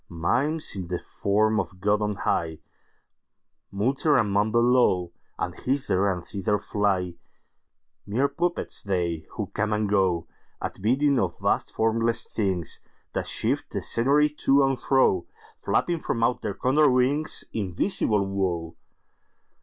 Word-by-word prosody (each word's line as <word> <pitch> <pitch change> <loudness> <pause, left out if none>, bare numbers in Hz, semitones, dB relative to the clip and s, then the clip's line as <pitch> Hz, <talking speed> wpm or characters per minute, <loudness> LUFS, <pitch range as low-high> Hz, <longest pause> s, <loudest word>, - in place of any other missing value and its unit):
Mimes, 120 - 0
in 95 -3 -4
the 90 0 -2
form 110 +4 0
of 90 -1 -5
God 105 +2 +1
on 105 -1 -1
high, 80 -4 -1 1.1
Mutter 135 +9 +2
and 110 -4 +1
mumble 110 +4 +2
low, 120 -8 +3 0.3
And - - -3
hither 100 -8 0
and 90 -2 -5
thither 100 +1 -1
fly—Mere 100 +5 -3
puppets 175 +5 -2
they, 85 -5 -2
who - - -5
come 110 +1 -1
and 105 0 0
goAt 95 -4 +1 0.6
bidding 135 +5 +2
of 90 -3 -1
vast - - 0
formless 115 +1 +1
thingsThat 95 -7 -4
shift - - 0
the - - -3
scenery 140 +5 +3
to 140 -2 +3
and 135 -2 +1
fro, 130 -10 +2 0.3
Flapping 170 -1 0
from 115 - -1
out 120 +1 +1
their 100 - -3
Condor 145 +4 +3
wingsInvisible 125 - 0
Woe! 90 -4 -2
105 Hz, 125 wpm, -25 LUFS, 95-130 Hz, 1.1 s, low